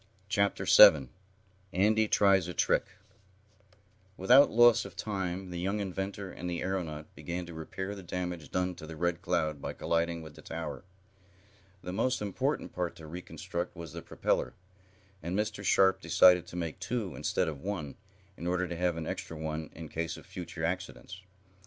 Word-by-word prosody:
Chapter 100 0 +1
7 65 -5 +8 0.6
Andy 110 +4 +3
Tries 95 -4 +4
a 90 - -6
Trick - - +2 1.3
Without 125 +9 +7
loss 120 0 +6
of - - -10
time 95 -3 -3
the 90 - -4
young 100 +4 -1
inventor 95 0 -4
and 90 - -6
the 85 -1 -2
aeronaut 80 -5 -4
began 90 +1 -5
to 85 - -9
repair 95 +5 -5
the 100 - -8
damage 90 -3 -4
done 90 0 0
to 85 -3 -10
the 80 - -7
Red 85 +1 -1
Cloud 80 -4 -1
by - - -4
colliding 85 0 -1
with 80 -1 -10
the - - -13
tower. - - -6 1.0
The 90 - -5
most 125 +6 +1
important 130 +8 -2
part 90 -1 -2
to 80 - -11
reconstruct 85 +1 -5
was 85 -3 -8
the - - -6
propeller, - - -1 0.7
and 85 +4 -3
Mr. 105 -1 -2
Sharp 95 -1 +4
decided 90 -1 +5
to - - -10
make 85 -3 -4
two, 115 -7 -3
instead - - 0
of 75 -4 -5
one, 90 -8 -4 0.4
in 85 - -5
order 90 +1 0
to 85 - -5
have 90 -1 0
an 80 - -4
extra 80 - -5
one 80 0 -4
in 80 0 -7
case 80 +2 -3
of - - -13
future 85 -2 -5
accidents. 90 +1 -4
90 Hz, 170 wpm, -30 LUFS, 85-95 Hz, 1.3 s, 7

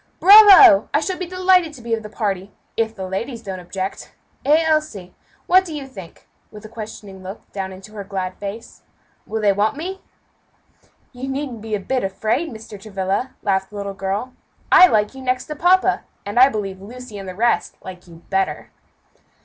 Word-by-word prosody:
"Bravo! 395 -4 +9
I - - +5
shall 365 +2 -3
be 365 - -4
delighted 365 -2 +2
to 260 - -12
be 230 -1 -3
of 225 - -1
the 210 - -9
party, 200 -3 -3 0.2
if 225 0 -1
the 190 -2 -6
ladies 230 +5 -5
don't 190 -3 -6
object; 190 +2 -6 0.3
eh! 305 +4 +4
Elsie, 305 - -1 0.3
what 370 +1 +5
do 330 -4 -7
you 285 -2 -6
think?" 195 -10 -13 0.2
with 210 0 -12
a - - -10
questioning 210 -3 -9
look 190 +3 -10
down 190 -1 -5
into 190 +3 -12
her 205 -2 -6
glad 190 -2 -4
face, 205 +3 -8 0.5
"will 220 - -3
they 200 -1 +4
want 210 +7 0
me?" 375 +5 -6 1.1
"You 255 +2 -6
needn't 265 -4 -4
be 220 -1 -3
a - - -3
bit 255 +6 -2
afraid, 215 - -1
Mr. 220 -4 -11
Travilla," 195 +4 -3
laughed 190 -1 0
the 210 - -14
little 200 -1 -5
girl; 195 +6 -4 0.4
"I 365 - +9
like 210 -6 +1
you 265 - -10
next 255 0 -1
to 300 - -6
papa, 360 +4 +3 0.2
and 205 +4 -1
I 260 +2 +8
believe 195 -5 -5
Lucy 230 0 -10
and 195 -1 -7
the 185 - -8
rest 235 +4 0
like 180 -1 -10
you 170 0 -15
better." 190 0 -1
220 Hz, 190 wpm, -20 LUFS, 195-275 Hz, 1.1 s, Bravo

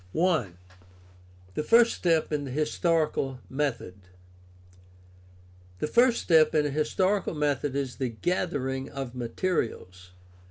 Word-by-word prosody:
I. 160 - +1 1.0
THE - - -2
FIRST 230 +8 +5
STEP 165 -3 +1
IN 145 -1 -1
THE - - -6
HISTORICAL 150 -2 0
METHOD 115 -10 -3 1.7
The - - -2
first 235 +9 +3
step 160 -2 +4
in 150 -1 +3
a 145 - -1
historical 185 +6 0
method 145 -2 -1
is 135 -3 -3
the 130 -3 -1
gathering 135 -1 -2
of 135 -3 -6
materials. 115 - -3
145 Hz, 115 wpm, -27 LUFS, 130-165 Hz, 1.7 s, FIRST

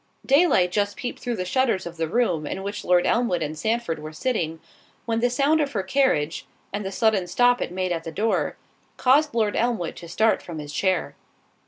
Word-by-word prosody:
Daylight 275 - +4
just 205 +1 0
peeped 245 - -5
through 245 -2 -3
the 185 -3 -3
shutters 230 -1 +1
of 170 0 -8
the 165 0 -1
room 170 -7 0
in 190 +4 -4
which 200 +1 -5
Lord 180 -1 +3
Elmwood 230 -9 +1
and 155 +1 -4
Sandford 220 -2 -1
were 155 +1 -7
sitting, 165 -4 -2 0.5
when 230 -1 0
the 245 +1 +2
sound 285 +5 +2
of 285 -2 -2
her 200 -4 -1
carriage, 190 - +1 0.3
and 205 +1 -2
the 190 - -4
sudden 205 -3 +1
stop 245 +7 +3
it - - -2
made 185 0 -2
at 165 -1 -2
the 165 - -6
door, 215 +7 0 0.4
caused 285 +2 +3
Lord 215 -3 +1
Elmwood 230 -8 -1
to 170 - -10
start 220 +5 +2
from 170 -2 -8
his 150 -1 -7
chair. 185 +1 0
200 Hz, 205 wpm, -24 LUFS, 170-245 Hz, 0.5 s, Daylight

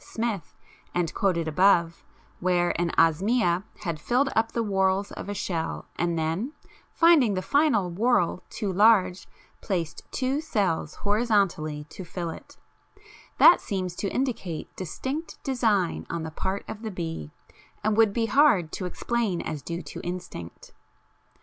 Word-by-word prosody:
Smith, 220 -8 -4 0.4
and 175 -2 0
quoted 170 -5 0
above, 170 0 +3 0.4
where 175 -1 +2
an 175 - +1
Osmia 175 +3 +3 0.2
had 170 -5 -3
filled 255 - +1
up 225 0 +2
the 230 - -1
whorls 195 -1 +1
of - - -7
a - - -2
shell 170 -4 -3
and 170 0 0
then, 165 - -1 0.4
finding 310 - +5
the 185 - -1
final 280 - +3
whorl 185 -2 +1
too 210 -4 -3
large, 190 -3 +4 0.3
placed 175 -6 -3
two 270 +3 -1
cells 195 - -1
horizontally 200 -9 +1
to 150 +5 -10
fill 170 -1 -4
it: - - -12 0.8
that - - +8
seems 185 -4 -3
to 200 - -2
indicate 225 - -3
distinct 265 - -5
design 225 - 0
on 170 -1 -3
the 160 - -5
part 190 +5 -3
of 215 - -7
the 220 - -4
bee 165 - -5 0.5
and 215 0 +2
would 220 -1 +5
be 225 +2 0
hard 225 - +4
to 185 - -4
explain 215 0 -1
as 150 - -4
due 170 +3 -5
to 145 - -8
instinct. 175 - -7
190 Hz, 145 wpm, -26 LUFS, 170-225 Hz, 0.8 s, that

